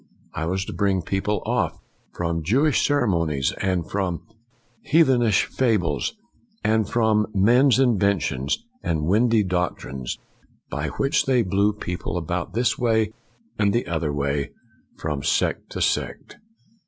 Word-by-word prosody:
I 80 - -3
was 95 +2 -1
to - - -6
bring 95 -3 +1
people 100 +3 -1
off - - 0 0.3
from 85 -1 -2
Jewish 135 - +2
ceremonies 85 - +1
and 90 -3 0
from 95 -4 -2 0.6
heathenish 130 - +3
fables, 105 - 0 0.5
and 110 -1 +2
from 110 -2 +2
men's 120 +6 +5
inventions 100 - +1 0.2
and 80 -2 -1
windy 110 +4 +3
doctrines, 90 -8 -3 0.5
by - - -2
which 140 +1 0
they 125 -3 +3
blew 100 +2 +2
people 90 -3 -4
about 90 +1 -3
this 120 +1 +1
way 110 -3 +1 0.5
and 100 -1 +3
the 120 - 0
other 80 -3 -1
way, 70 0 -1 0.5
from 75 -3 -3
sect - - 0
to - - -4
sect." - - -2
100 Hz, 130 wpm, -23 LUFS, 85-115 Hz, 0.6 s, men's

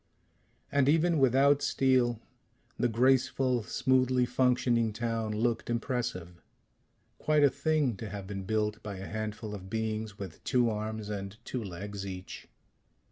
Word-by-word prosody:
And 140 -1 +3
even 165 +1 +3
without 135 +2 +4
steel, 130 -4 +2 0.6
the 120 - +1
graceful, 130 +1 +2
smoothly 130 +2 +2
functioning 120 -3 +2
town 115 -1 -2
looked 115 +3 -1
impressive 115 -8 -3 0.8
quite 150 -1 +3
a 140 - +6
thing 140 -3 +1
to 110 +1 -6
have 100 -1 -6
been 95 0 -5
built 105 +1 -1
by 105 -1 -6
a 95 - -7
handful 110 0 -5
of 95 -2 -8
beings 110 -1 -3
with 95 -6 -8
two 120 -3 +2
arms 110 0 -4
and 100 0 -5
two 125 -3 -3
legs 100 +1 -6
each. 95 -1 -8
115 Hz, 135 wpm, -30 LUFS, 105-130 Hz, 0.8 s, a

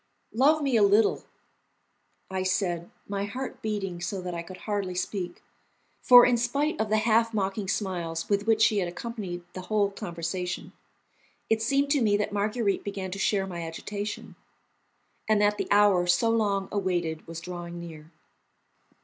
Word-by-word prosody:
"Love 290 +6 +4
me 270 -3 +1
a 220 - +5
little," 205 +2 +4 1.1
I 190 0 -1
said, 180 -2 -1 0.2
my 200 0 -2
heart 255 +6 -6
beating 195 -5 -3
so 190 +2 -3
that 180 -1 -5
I 170 - -3
could 180 +2 -11
hardly 200 -4 -2
speak; 180 0 -4 0.6
for, 245 -1 +9
in 245 -1 +3
spite 275 +4 0
of 220 - -1
the 215 - +3
half 225 +1 +2
mocking 195 0 -1
smiles 175 -5 -2
with 205 +1 0
which 220 -1 +4
she 215 -1 +4
had 180 - 0
accompanied 180 -2 -6
the 185 - -6
whole 200 +2 +1
conversation, 180 -2 -4 0.8
it 220 0 +3
seemed 275 +4 +1
to 285 -3 +3
me 205 -3 +3
that 210 0 -2
Marguerite 205 0 0
began 195 -2 -5
to 195 - -5
share 195 -1 +1
my 175 -3 -6
agitation, 200 +5 -5 0.9
and 215 -1 +4
that 210 0 +2
the - - -1
hour 200 -3 +4
so 180 +6 +3
long 200 -4 +1
awaited 175 -5 -2
was 165 0 -6
drawing 175 0 -7
near. 160 -2 -10
200 Hz, 165 wpm, -27 LUFS, 180-220 Hz, 1.1 s, for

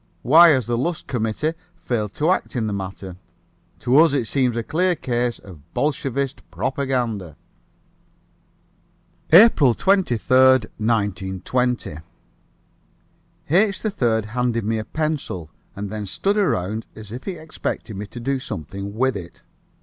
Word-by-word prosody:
Why 165 +6 +8
has 130 -6 +3
the 120 +1 -1
Lusk 170 +5 -2
committee 120 +6 -1 0.2
failed 105 -5 -3
to 155 +4 +2
act 185 - -1
in 115 -3 0
the 105 - -2
matter? 95 -1 -6 0.6
To 125 +3 +3
us 160 -3 +5
it 135 -5 +1
seems 125 0 0
a 115 - -1
clear 180 +7 +1
case 120 -4 -1
of 90 -6 -13 0.2
Bolshevist 140 -2 -1
propaganda. 115 - -2 1.9
APRIL 160 - +7
23, 150 - +2 0.4
1920. 105 0 -1 1.5
H. 195 +3 +3
3rd 120 - 0
handed 120 0 -1
me 110 +1 0
a 110 - -5
pencil, 150 - -3 0.2
and 100 0 -5
then 105 -1 -5
stood 195 - 0
around 110 - 0
as 105 -2 -11
if 125 +3 -7
he 195 - -3
expected 155 - -5
me 100 +2 -6
to 120 - -9
do 135 +3 -1
something 100 - -6
with 130 +2 +1
it. 85 -3 -9
120 Hz, 135 wpm, -22 LUFS, 105-145 Hz, 1.9 s, Why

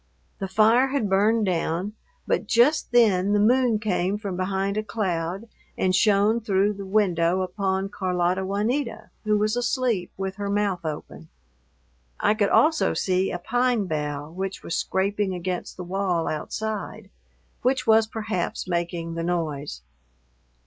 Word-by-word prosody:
The 195 - -3
fire 220 +6 +4
had 260 -7 -1
burned 210 +3 +3
down, 180 +2 -1 0.3
but - - -1
just 245 +6 +3
then 205 -5 +4
the 205 - +3
moon 240 +1 +3
came 200 -2 0
from 200 -3 -5
behind 190 +2 -1
a 215 - 0
cloud 190 -2 -3 0.3
and 185 0 +2
shone 210 +2 +3
through 205 -1 +1
the 200 -1 -8
window 185 -3 +2
upon 190 +1 -1
Carlota 185 -1 0
Juanita, 220 +5 -2
who 210 0 +3
was 215 +2 +1
asleep 245 -6 0
with 190 0 -4
her 200 -1 -3
mouth 200 -3 0
open. 155 +1 -6 0.9
I - - +3
could 210 -2 +1
also 315 0 +3
see 185 0 +1
a 175 - -3
pine 245 +3 +1
bough 150 -2 -3
which 190 +2 -5
was 170 - -3
scraping 195 0 0
against 180 0 -4
the 180 - -5
wall 180 -2 -1
outside, 215 +7 -4 0.5
which 255 +1 +1
was 220 -1 +5
perhaps 215 -5 -3
making 170 -1 -2
the 165 0 -3
noise. 160 -5 -3
195 Hz, 145 wpm, -25 LUFS, 180-215 Hz, 0.9 s, was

